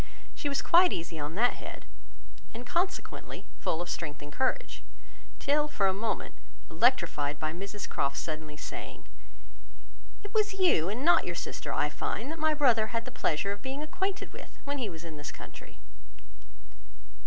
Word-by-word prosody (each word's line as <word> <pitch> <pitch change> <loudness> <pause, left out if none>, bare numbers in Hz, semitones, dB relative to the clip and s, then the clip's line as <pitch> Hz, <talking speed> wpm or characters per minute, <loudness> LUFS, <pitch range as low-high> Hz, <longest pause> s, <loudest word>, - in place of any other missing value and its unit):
She 290 - -2
was 280 - 0
quite 355 +1 +7
easy 165 -1 -3
on 150 +2 -3
that 240 +5 +4
head, - - -7 0.7
and 240 +2 -6
consequently 350 +7 -2
full 165 +2 0
of - - -11
strength 150 -4 -3
and 145 - -9
courage, 380 - 0 0.6
till 295 +1 +3
for 210 -9 +1
a 190 - +4
moment 215 +3 -2 0.4
electrified 165 - +3
by 155 0 -1
Mrs 200 +3 -5
Croft's 140 0 0
suddenly 155 -2 -4
saying,— - - -7 1.2
"It 410 0 -8
was 425 -2 +3
you, 355 - +4
and 240 +8 -2
not 345 - +6
your - - -1
sister, - - -4
I - - +2
find, 285 - -3
that 325 - -5
my 310 0 +3
brother 240 -7 +5
had 230 0 -2
the - - -6
pleasure 170 +5 +1
of 200 - -5
being 270 +2 -3
acquainted 380 +6 -2
with, - - -10
when 285 0 -2
he 235 -5 -1
was 165 -2 -8
in 165 -2 -7
this 145 0 -5
country." - - -11
230 Hz, 170 wpm, -31 LUFS, -, 1.2 s, quite